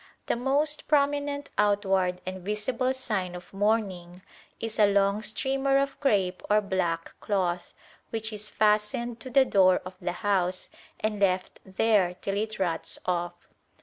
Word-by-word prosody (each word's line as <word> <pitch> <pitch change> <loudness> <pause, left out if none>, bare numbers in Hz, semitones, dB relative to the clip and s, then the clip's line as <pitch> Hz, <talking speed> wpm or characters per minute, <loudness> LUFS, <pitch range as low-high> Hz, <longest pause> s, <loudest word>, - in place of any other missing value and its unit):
The - - 0
most 280 +5 0
prominent 285 -1 +1
outward 195 -3 +2
and 185 0 -5
visible 210 +6 -1
sign 210 -9 -2
of 180 +2 -11
mourning 195 -4 -1 0.4
is 225 -1 -4
a 205 -1 +6
long 200 +1 +2
streamer 270 +5 +1
of 275 0 -1
crape 195 -9 +1
or 210 +1 +5
black 185 -5 -2
cloth, 180 -4 -1 0.3
which 220 -1 -4
is 210 0 -5
fastened 220 +3 +1
to 260 - -8
the 265 +1 +5
door 185 -5 +4
of 185 - -7
the 175 - -2
house 185 -2 0 0.3
and 215 -1 -1
left 185 -2 0
there 190 -2 +2
till 195 +2 -3
it 215 +1 -2
rots 175 -4 -1
off. 175 -1 -2
205 Hz, 150 wpm, -27 LUFS, 185-235 Hz, 0.4 s, a